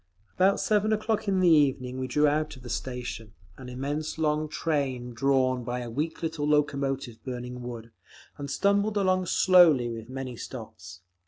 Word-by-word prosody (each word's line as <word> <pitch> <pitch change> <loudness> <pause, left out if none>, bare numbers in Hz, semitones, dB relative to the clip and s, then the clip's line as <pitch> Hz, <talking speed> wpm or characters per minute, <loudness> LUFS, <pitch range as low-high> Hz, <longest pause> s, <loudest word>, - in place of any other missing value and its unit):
About 195 +2 +3
seven 215 0 +1
o'clock 215 0 -1
in 190 -1 +2
the 180 - +4
evening 135 -5 +3
we 130 - -2
drew 150 +4 +2
out 150 +1 0
of 130 - -15
the 120 - -7
station, 120 -4 -5 0.2
an 125 -1 -9
immense 145 +5 -4
long 155 -1 0
train 135 -6 -2
drawn 130 0 +1
by 125 +1 -3
a 120 -1 -6
weak 155 +7 -3
little 160 -2 -2
locomotive 140 -5 0
burning 125 -1 -6
wood, 115 -1 -8 0.4
and 140 -1 -7
stumbled 200 +7 +1
along 185 -2 +1
slowly, 165 -10 +5
with 115 0 -8
many 130 -1 -5
stops. 95 -8 -9
140 Hz, 165 wpm, -27 LUFS, 125-160 Hz, 0.4 s, slowly